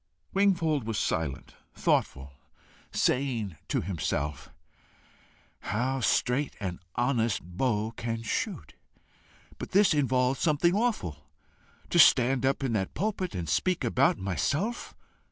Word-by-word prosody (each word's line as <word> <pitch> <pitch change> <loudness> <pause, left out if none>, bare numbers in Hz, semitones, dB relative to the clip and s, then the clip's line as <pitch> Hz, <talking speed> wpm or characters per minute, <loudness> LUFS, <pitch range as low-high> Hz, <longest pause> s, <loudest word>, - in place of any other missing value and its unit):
Wingfold 170 - +2
was 110 -2 -2
silent, 80 -6 -2 0.2
thoughtful, 70 +1 0 0.6
saying 120 -9 0
to - - 0
himself 75 -4 -3 1.1
"How 125 +6 -1
straight 130 +3 +1
an 95 -4 -4 0.2
honest 120 -3 0
bow 105 +4 -1
can 115 0 -4
shoot! 115 - -3 0.9
But - - -7
this 200 -2 +5
involves 130 -2 +1
something 165 +2 +2
awful. 90 - -1 0.6
To 175 - +3
stand 130 -3 +5
up 135 +1 0
in 130 -4 0
that 95 -4 -2
pulpit 195 - -2
and 85 -3 -3
speak 170 - 0
about 125 +3 +2
myself! 140 - -2
125 Hz, 115 wpm, -28 LUFS, 95-145 Hz, 1.1 s, this